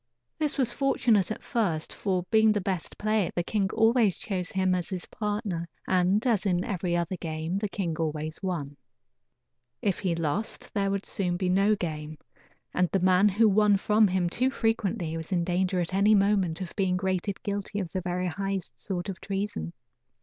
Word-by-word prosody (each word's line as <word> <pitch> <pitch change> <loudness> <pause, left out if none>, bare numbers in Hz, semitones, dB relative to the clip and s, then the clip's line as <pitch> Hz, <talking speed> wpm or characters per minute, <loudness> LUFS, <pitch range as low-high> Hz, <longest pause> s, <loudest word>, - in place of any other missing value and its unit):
This 305 -1 0
was 250 -3 +1
fortunate 235 -8 +2
at 215 - -5
first; 175 -10 -1
for 185 -3 -1
being 220 -1 +5
the 205 - 0
best 185 -3 -3
player 215 -3 +1
the 175 - +1
king 195 +1 0
always 225 -3 +3
chose 185 -4 -3
him 190 -1 +1
as 180 -2 -2
his 185 -3 -4
partner, 205 -5 -3 0.2
and, 190 +5 +2
as 225 -6 +2
in 180 -3 +1
every 180 -2 -1
other 175 +2 -2
game, 160 +1 -3
the 205 0 -2
king 180 -5 -2
always 155 -1 -3
won. 155 -7 -3 1.0
If 195 -3 0
he 180 -4 0
lost 165 +7 -3
there 200 -2 +1
would 195 0 -2
soon 180 -4 -1
be 185 0 0
no 200 +3 +4
game, 155 -4 -5 0.6
and 180 -1 +2
the 195 - +1
man 185 +2 +5
who 215 +3 +4
won 205 0 +4
from 210 +2 +4
him 185 -2 +1
too 250 +9 +1
frequently 220 -9 -1
was 160 +2 -7
in 175 -2 +2
danger 185 +1 0
at 175 +1 -2
any 205 +3 +5
moment 195 -4 +2
of 180 - -6
being 190 -3 +1
rated 190 +1 -2
guilty 205 0 -3
of 180 -4 -4
the 185 - -2
very 180 0 -2
highest 190 -7 -3
sort 175 - -3
of 195 -2 -6
treason. 195 - -3
190 Hz, 185 wpm, -27 LUFS, 175-210 Hz, 1.0 s, being